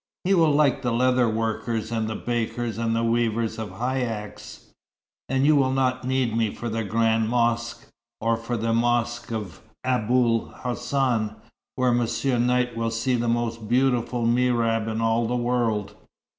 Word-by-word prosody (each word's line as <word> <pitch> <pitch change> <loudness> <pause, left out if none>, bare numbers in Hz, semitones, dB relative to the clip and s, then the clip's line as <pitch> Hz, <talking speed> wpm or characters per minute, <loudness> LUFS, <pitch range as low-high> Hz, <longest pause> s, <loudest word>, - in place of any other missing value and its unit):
He 190 - +2
will 165 -4 +4
like 145 -2 +3
the 120 -2 -1
leather 125 0 +3
workers 110 0 -2
and 110 -1 -1
the 110 - -3
bakers, 115 -1 -2
and 115 -1 0
the 115 - 0
weavers 115 -1 0
of 110 -2 -4
haïcks. 115 -2 -4 0.7
And 135 +1 +2
you 155 +1 +5
will 135 -2 +3
not 130 -1 0
need 130 -3 0
me 115 -2 +1
for 120 - -4
the 115 0 -2
Grande 110 +1 +1
Mosquée, 120 0 0 0.3
or 115 +1 +1
for 115 +1 -4
the 115 +1 0
Mosquée 120 0 0
of 105 -7 -6 0.2
Aboul 120 -1 +2 0.2
Hassan, 125 -3 -1 0.4
where 130 -1 +2
Monsieur 120 +2 0
Knight 125 0 +1
will 115 0 -1
see 115 +3 -1
the 120 -1 0
most 115 -2 -2
beautiful 125 -1 +1
mihrab 115 -2 +2
in 110 0 -2
all 115 +1 +1
the 125 - -1
world. 120 -4 0
120 Hz, 160 wpm, -24 LUFS, 115-125 Hz, 0.7 s, you